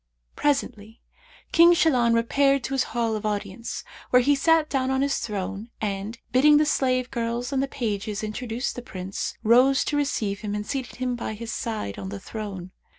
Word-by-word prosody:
Presently 225 -6 -1 0.5
King 340 +1 +7
Shahlan 245 -9 +3
repaired 275 +3 +2
to 270 - -3
his 265 -1 +1
hall 230 -1 -1
of 215 - -4
audience, 205 +1 -4 0.3
where 250 0 +5
he 290 +3 +4
sat 320 +2 +3
down 260 -3 0
on 265 0 +1
his 280 0 0
throne 205 +1 -4
and, 205 +2 -3
bidding 295 +4 +6
the 305 - +4
slave 255 -3 +1
girls 235 +2 -2
and 265 - +1
the 275 - 0
pages 215 -5 -3
introduce 230 +3 -3
the 245 - -6
Prince, 190 -4 -5
rose 255 +4 +5
to 295 - -1
receive 215 -9 -1
him 210 -1 -4
and 210 0 -3
seated 265 +1 -4
him 250 -1 -2
by 230 -2 -4
his 225 +1 -6
side 210 - -4
on 95 -1 -5
the 100 0 -6
throne. 195 - -7
235 Hz, 185 wpm, -25 LUFS, 210-270 Hz, 0.5 s, King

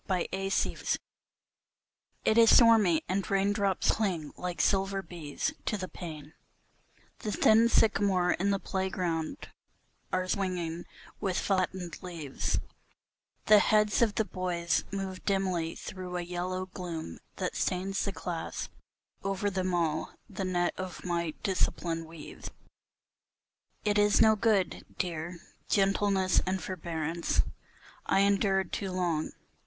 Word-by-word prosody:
DISCIPLINE 195 +1 0 1.3
IT 220 - +4
is 225 -1 +8
stormy, 220 -9 +6
and 195 +1 -1
raindrops 200 0 +2
cling 180 -9 -1
like 180 -1 -4
silver 195 0 +2
bees 155 -6 -4
to 210 - 0
the 185 -2 -4
pane, 155 -5 -8 0.9
The 215 - -3
thin 225 +2 +5
sycamores 195 -5 +3
in 195 +2 +1
the 200 - +2
playground 180 -5 -2 0.6
are 185 0 0
swinging 180 -3 -2 0.3
with 190 -4 -1
flattened 185 -3 -1
leaves; 165 -7 -3 0.9
The 210 0 +8
heads 210 +1 +3
of 220 -3 +3
the 220 - +1
boys 175 -4 -1
move 195 -1 -4
dimly 185 -4 0
through 180 -1 -6
a 175 - -2
yellow 180 +1 -3
gloom 170 - -6 0.2
that - - -3
stains 190 +2 0
The 200 - -1
class; 175 -3 -4 0.5
over 195 +1 -1
them 185 -1 -1
all 160 -2 0
the - - -16
dark 185 - -2
net 175 0 +1
of 185 -1 -6
my 170 -3 -1
discipline 170 -3 0
weaves. 160 -1 -9 1.4
It 210 0 +3
is 205 0 +4
no 220 0 +6
good, 210 -3 +1
dear, 170 0 -3 0.3
gentleness 195 -2 +3
and 190 0 0
forbearance, 165 -2 -1 0.6
I 195 - +4
endured 195 -1 +2
too 195 -2 -2
long. 175 -4 -1
185 Hz, 125 wpm, -30 LUFS, 175-195 Hz, 1.4 s, is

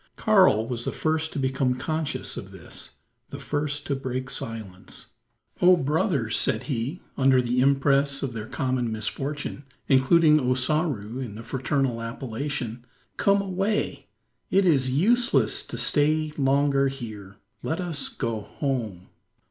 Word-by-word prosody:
Karl 185 - +4
was 120 -1 -3
the - - -2
first 160 0 -1
to - - -6
become 130 -1 0
conscious 155 +4 -2
of - - -7
this - - -7 0.3
the - - -7
first 145 -1 -2
to 140 - -1
break 130 -1 -4
silence. 105 -5 -6 0.5
"Oh, 180 0 +7
brothers!" 140 - 0
said 110 - +1
he, 135 +5 -3 0.2
under 130 -1 +4
the 125 0 0
impress 140 +1 +2
of 130 -3 -3
their 110 -1 -6
common 130 -3 -1
misfortune 140 +6 -4 0.2
including 150 +3 +5
Ossaroo 130 - 0
in 120 -6 -5
the 115 - -8
fraternal 130 -1 -1
appellation. 120 0 -4 0.3
"Come 200 0 +3
away! 195 +3 -2 0.4
It 195 0 +3
is 135 -7 +3
useless 225 - +2
to - - -6
stay 155 +1 +2
longer 140 0 +2
here. 110 -7 -7 0.3
Let 160 - -2
us 170 -5 -3
go 115 -4 -3
home!" 110 - -4
135 Hz, 135 wpm, -25 LUFS, 120-155 Hz, 0.5 s, Oh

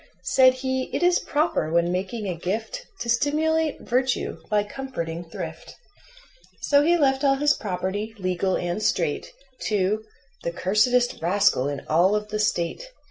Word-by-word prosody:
Said 255 +6 +5
he: 260 0 -2
"It - - 0
is 355 0 +4
proper, 300 - 0
when 170 +1 +2
making 195 +5 -3
a 185 - -1
gift, 220 - -4
To - - -4
stimulate 305 +5 +1
virtue 255 +1 -1
by 210 -1 +2
comforting 205 -9 -5
thrift." 165 - -8 0.9
So 285 -1 +4
he 340 +4 +3
left 270 -3 +2
all 275 -1 +4
his 295 +2 +3
property, 205 +3 -3
legal 185 0 0
and 175 +4 -3
straight, 165 -8 0 0.4
To 210 +1 0 0.4
"the 170 - -2
cursedest 220 +7 +2
rascal 175 -6 +2
in 140 -1 -5
all 175 +6 +3
of 210 0 -3
the 215 0 -2
State." 210 - -1
215 Hz, 150 wpm, -24 LUFS, 180-270 Hz, 0.9 s, Said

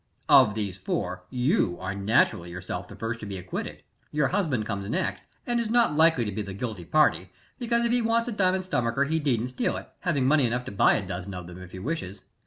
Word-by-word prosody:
Of 110 -6 +6
these 100 -3 -3
four, 90 0 -3
you 125 - +1
are 95 +1 -3
naturally 100 -3 +2
yourself 90 +1 -5
the 100 - -11
first 115 +3 -4
to 105 - -7
be 100 -1 -5
acquitted. 90 0 -6 0.3
Your 150 -3 +1
husband 155 - 0
comes 100 -2 -4
next, 95 -4 -2 0.2
and 240 -1 0
is 230 -2 -1
not 235 -9 +3
likely 160 -6 +4
to 105 - -2
be 105 +2 -3
the 100 -2 -6
guilty 105 -5 -5
party, 155 - +2 0.3
because 235 -1 +1
if 235 - +1
he 245 0 +3
wants 230 +1 +1
a - - -2
diamond 190 -3 +1
stomacher 125 -5 +1
he 160 +3 0
needn't 125 -5 0
steal 125 - -1
it, - - -9
having 150 -9 0
money 140 -1 +4
enough 125 +2 -2
to - - -6
buy 100 - +4
a - - -2
dozen 90 +2 -5
of 90 -1 -6
them 90 +1 -10
if 90 -1 -11
he - - -8
wishes. 100 - -4
115 Hz, 230 wpm, -27 LUFS, 95-160 Hz, 0.3 s, Of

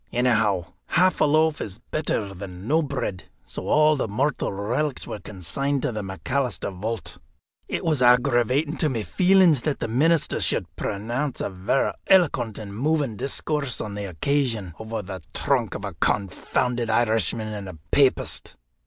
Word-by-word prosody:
Anyhow, 110 -7 +2 0.2
half 185 +1 +3
a - - +6
loaf 155 +1 +3
is 100 -1 -5
better 115 -9 -2
than 95 +1 -8
no 160 +4 +3
bread, 135 - -3 0.2
so - - -6
all 155 0 +5
the 135 - -1
mortal 130 +8 0
relics 120 +9 -2
were 105 - -6
consigned 105 - -2
to - - 0
the 110 -2 -3
McAlister 100 +2 -2
vault. 110 +4 -5 0.5
It - - -3
was 155 -5 +2
aggravating 125 +4 +3
to 155 - +1
my 115 -5 -2
feelings 180 - +4
that 150 0 -1
the - - -2
minister 150 +8 +2
should - - 0
pronounce 120 +7 -3
a - - -2
varra 95 +8 0
eloquent 145 - +3
and 100 -2 -7
moving 145 -1 0
discourse 140 +2 -1
on 105 - -4
the 100 0 -4
occasion 110 - -1
over 110 -1 -4
the 95 -1 -7
trunk - - 0
of - - -5
a - - -5
confounded 115 +5 0
Irishman 110 -1 +2
and 100 -3 -6
a 85 - -9
papist." 140 -2 +2
120 Hz, 160 wpm, -24 LUFS, 105-145 Hz, 0.5 s, a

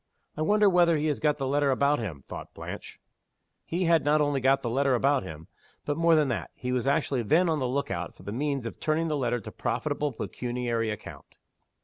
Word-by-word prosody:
"I 155 - -4
wonder 210 +6 +4
whether 175 -3 +4
he 150 - -1
has 145 - -1
got 150 -1 +1
the 135 - -2
letter 140 +1 +2
about 140 +2 +2
him?" 85 - -5
thought - - -9
Blanche. - - -8 0.6
He 175 +3 -2
had 165 -2 +3
not 150 +1 +3
only 145 -2 +1
got 135 +1 +3
the 120 - -1
letter 135 +1 +2
about 135 +3 +2
him 80 -3 -9 0.4
but, 145 - -1
more 165 +1 +4
than 155 -2 +3
that, 120 - -3
he 125 - -4
was 125 0 0
actually 140 -2 +1
then 160 - +3
on 160 -2 +1
the 130 - 0
look 140 +3 -2
out 85 0 -4
for - - -16
the 100 - -5
means 140 +1 -2
of 115 - -6
turning 160 +1 0
the 150 - 0
letter 120 -3 0
to 105 - -9
profitable 145 +4 -2
pecuniary 120 -1 -3
account. 105 - -8
140 Hz, 225 wpm, -27 LUFS, 120-150 Hz, 0.6 s, wonder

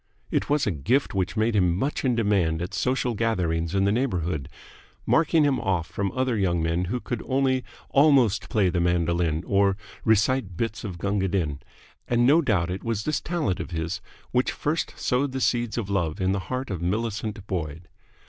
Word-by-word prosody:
It - - 0
was 145 0 +2
a 105 - +1
gift 120 - 0
which 95 +2 -1
made 110 +1 +2
him 90 -3 +3
much 135 +8 -1
in 125 -3 +2
demand 100 -8 +1
at 90 +1 -4
social 125 -1 0
gatherings 90 -7 0
in 95 - +3
the 100 - +3
neighbourhood, 90 - -1 0.6
marking 160 -1 +3
him 140 -3 +2
off 90 -4 0
from 95 +3 -3
other 130 -2 0
young 90 -4 +1
men 85 +2 0
who 125 +8 -2
could 120 -1 -4
only 130 -1 +1 0.3
almost 135 -8 +4
play 100 -4 +2
the 90 - 0
mandolin 85 -1 +1
or 100 -1 +2 0.3
recite 110 -3 +2
bits 115 +1 -2
of 95 -5 -5
Gunga 100 +1 0
Din; 80 -7 -1 0.5
and 120 0 +3
no 150 +6 +6
doubt 95 - +1
it 95 - -5
was 115 -3 -2
this 155 - -1
talent 155 - -1
of - - -5
his 80 -1 -3 0.3
which 125 +1 +2
first 155 +3 -2
sowed 130 +2 0
the 135 - -2
seeds 120 -3 0
of 115 -5 -2
love 90 -6 -1
in 95 0 +1
the 100 - 0
heart 130 -2 -3
of 90 -4 -4
Millicent 105 +2 -2
Boyd. 85 -3 -4
100 Hz, 190 wpm, -25 LUFS, 90-125 Hz, 0.6 s, no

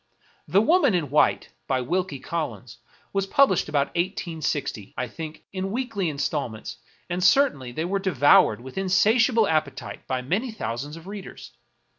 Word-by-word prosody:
*' - - -35
The 200 +3 +6
Woman 330 - +4
in 150 -6 -1
White," 150 - +3 0.2
by 130 -1 +1
Wilkie 175 +3 -1
Collins, 130 -6 -5 0.3
was 195 -1 0
published 275 +6 +3
about 140 -1 0
i860, 160 - -3
I 125 +1 -2
think, 160 +1 -8
in 190 0 -3
weekly 215 -5 -2
installments, 135 -6 -3 0.3
and 180 0 -2
certainly 185 - +3
they 160 +7 -3
were 195 +3 -1
devoured 145 - +4
with 130 +8 -6
insatiable 220 +4 +3
appetite 155 -3 -2
by 130 -1 -2
many 200 - -1
thou 220 - -4
sands 145 +6 -6
of 165 - -13
readers. 195 -7 -9
165 Hz, 155 wpm, -25 LUFS, 140-195 Hz, 0.3 s, The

